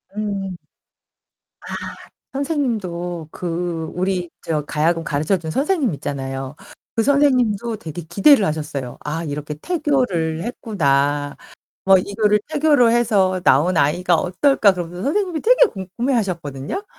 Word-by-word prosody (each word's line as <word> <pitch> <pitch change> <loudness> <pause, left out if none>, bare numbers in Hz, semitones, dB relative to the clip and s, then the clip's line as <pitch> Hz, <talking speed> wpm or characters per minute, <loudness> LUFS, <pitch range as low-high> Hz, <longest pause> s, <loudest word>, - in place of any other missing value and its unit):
음. 195 -3 -3 1.0
아. - - -7 0.6
선생님도 200 - -2
그 170 -2 -3
우리 180 -1 -1
저 155 -2 -1
가야금 165 +2 0
가르쳐 155 +6 0
준 160 -2 -6
선생님 280 - +1
있잖아요. 135 -1 -5 0.4
그 225 - +2
선생님도 245 -6 +2
되게 170 -3 -7
기대를 205 - +5
하셨어요. 150 -5 -4
'아 160 +3 -3
이렇게 150 0 -4
태교를 225 - -1
했구나. 145 - 0 0.5
뭐 195 0 +7
이거를 210 +2 +1
태교를 295 -6 +4
해서 205 -6 +2
나온 165 +6 +4
아이가 170 +4 +2
어떨까.' 200 - +3
그러면서 175 0 -6
선생님이 350 - 0
되게 - - +6
궁금해 205 +8 -3
하셨거든요? 170 - -3
185 Hz, 295 characters per minute, -20 LUFS, 160-240 Hz, 1.0 s, 뭐